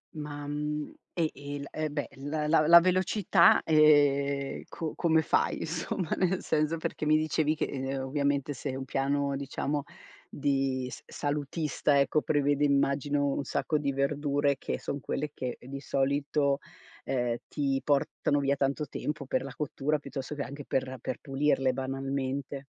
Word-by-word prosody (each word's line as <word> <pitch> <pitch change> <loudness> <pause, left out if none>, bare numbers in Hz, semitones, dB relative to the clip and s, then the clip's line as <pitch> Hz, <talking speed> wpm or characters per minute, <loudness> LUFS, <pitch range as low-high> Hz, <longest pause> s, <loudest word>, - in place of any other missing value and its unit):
Ma, 145 -1 -6
mhmm, 150 +1 -3 0.2
e 165 -3 +1
il 140 0 -6
e 155 -1 -2
beh, 145 0 -3
la 150 +2 -2
la 150 0 +4
la 170 0 +10
velocità, 185 +2 +4
ehm, 140 -3 +4
co 160 -2 -4
come 160 -2 +3
fai - - +1
insomma, 165 +1 -3
nel 185 0 +1
senso 155 +1 +1
perché 155 -1 -3
mi 155 0 +5
dicevi 155 0 +1
che, - - -1
uhm, 135 0 -3
ovviamente 140 +1 0
se 130 +1 -4
un 135 0 -5
piano 140 +1 0
diciamo 140 +1 -2 0.5
di 135 -3 0
s-salutista 145 0 -1
ecco, 150 +2 +2
prevede 145 -1 +1
immagino 140 0 +2
un 140 0 0
sacco 150 +3 0
di 140 -1 0
verdure 140 0 +1
che - - -3
son 140 - -4
quelle 145 +3 -3
che 125 -2 -4
di 135 +2 -7
solito, 140 +1 +1 0.5
uhm, 120 -3 0
ti 135 -2 -1
portano 145 0 +1
via 140 0 +2
tanto 140 +2 0
tempo 150 0 -4
per - - 0
la 135 - -7
cottura, 150 0 -1
piuttosto 140 0 -6
che 140 - -2
anche 140 +3 -7
per 130 0 -2
per - - -3
pulirle 135 -1 +1
banalmente. 135 +1 -3
145 Hz, 155 wpm, -29 LUFS, 135-150 Hz, 0.5 s, la